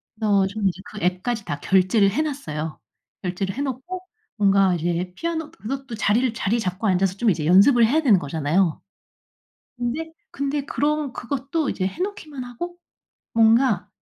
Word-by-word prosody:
그래서 205 -3 +2
좀 200 +1 -1
이제 185 0 -2
그 215 - -9
앱까지 190 +5 -1
다 145 - -4
결제를 190 +4 +3
해 250 - 0
놨어요. 160 - -4 0.4
결제를 190 +1 -3
해 275 - -3
놓고 285 +7 -4 0.4
뭔가 195 -2 +4
이제 175 +2 -2
피아노 325 0 -3
그것도 270 -4 -6
자리를 225 +3 +2
자리 230 0 0
잡고 190 +1 -2
앉아서 190 0 +2
좀 230 +2 +2
이제 160 -5 0
연습을 205 - +6
해야 290 +8 +2
되는 240 -10 +5
거잖아요. 160 +3 0 1.0
근데 260 +7 -3 0.2
근데 280 0 -2
그런 295 -1 -1
그것도 280 +4 -2
이제 185 - -2
해 195 - -7
놓기만 315 -9 -4
하고 345 +9 -7 0.6
뭔가 225 -2 +4
220 Hz, 330 characters per minute, -23 LUFS, 185-275 Hz, 1.0 s, 연습을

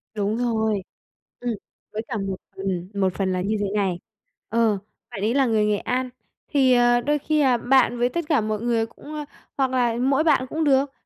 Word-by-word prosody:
Đúng 210 +1 0
rồi, 220 -4 0 0.6
ừm, 245 -1 -2 0.4
với 215 - -2
cả 240 - -3
một 195 -2 -2 0.2
ừm, 190 -2 -3
một 190 -2 +1
phần 190 -1 -1
là 185 - -1
như 210 +4 0
thế 205 - 0
này, 190 -4 0 0.5
ờ, 225 -2 +2 0.3
bạn 205 -5 -6
ấy 215 +3 +1
là 270 0 +3
người 220 -3 +2
Nghệ 210 -1 +2
An 255 +4 -2 0.4
thì, 265 -3 +4
ờ, 240 0 +4
đôi 295 +4 +1
khi, 305 +2 0
à, 260 -3 +4
bạn 245 0 +3
với 245 - +3
tất 340 +4 -3
cả 295 -7 +3
mọi 215 0 -2
người 230 -1 +1
cũng 260 +6 -12
ờ, 300 -1 -4 0.3
hoặc 265 -2 +1
là 245 -3 +2
mỗi 270 +3 +3
bạn 290 -5 +3
cũng 320 +1 -1
được, 275 -1 +3
235 Hz, 210 wpm, -24 LUFS, 210-265 Hz, 0.6 s, thì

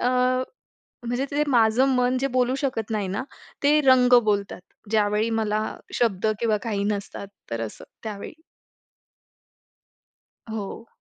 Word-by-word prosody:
अ, 245 - +2 1.0
म्हणजे 245 +3 -1
ते 285 - -4
जे 295 - +3
माझं 240 0 +4
मन 250 +1 +2
जे 275 - +1
बोलू 250 0 +2
शकत 250 -7 -2
नाही 210 -3 -1
ना, 195 +6 -2 0.4
ते 295 +2 +5
रंग 255 -3 +5
बोलतात. 205 -3 -1 0.3
ज्यावेळी 215 +1 +2
मला 215 -1 0 0.3
शब्द 220 -4 +1
किंवा 225 -2 +2
काही 205 -4 -2
नसतात, 200 -1 -3 0.2
तर 115 - -3
असं, 110 - -7 0.2
त्यावेळी. 205 -2 -6 2.2
हो. 220 +1 -6
225 Hz, 130 wpm, -24 LUFS, 205-250 Hz, 2.2 s, ते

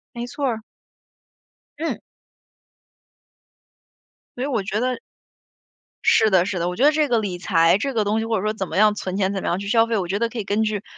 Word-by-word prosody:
没 235 - -4
错 285 +3 -5
儿。 230 -4 -1 1.2
嗯。 325 +2 -2 2.4
所 - - -3
以 - - 0
我 235 -8 -1
觉 205 +2 -2
得 255 0 -1 1.1
是 220 - +5
的， 190 -4 +4
是 190 -1 -3
的， 170 +1 -1
我 180 - -4
觉 255 - +2
得 300 - +6
这 305 -1 +1
个 240 -2 +2
理 195 -5 -3
财， 170 -1 +3
这 275 +3 -3
个 220 -2 +1
东 210 +2 0
西， 225 - -3
或 225 0 0
者 190 - -2
说 215 0 0
怎 195 -4 -5
么 - - -5
样 210 +1 +5
存 190 -2 -4
钱， 195 -1 0
怎 195 - -3
么 - - -3
样 175 - 0
去 200 - -6
消 225 +1 +4
费， 230 -1 -1
我 190 -4 -1
觉 190 +3 -1
得 235 +1 0
可 230 - -8
以 215 - -3
根 205 +3 0
据 215 -2 -1
215 Hz, 245 characters per minute, -22 LUFS, 195-235 Hz, 2.4 s, 得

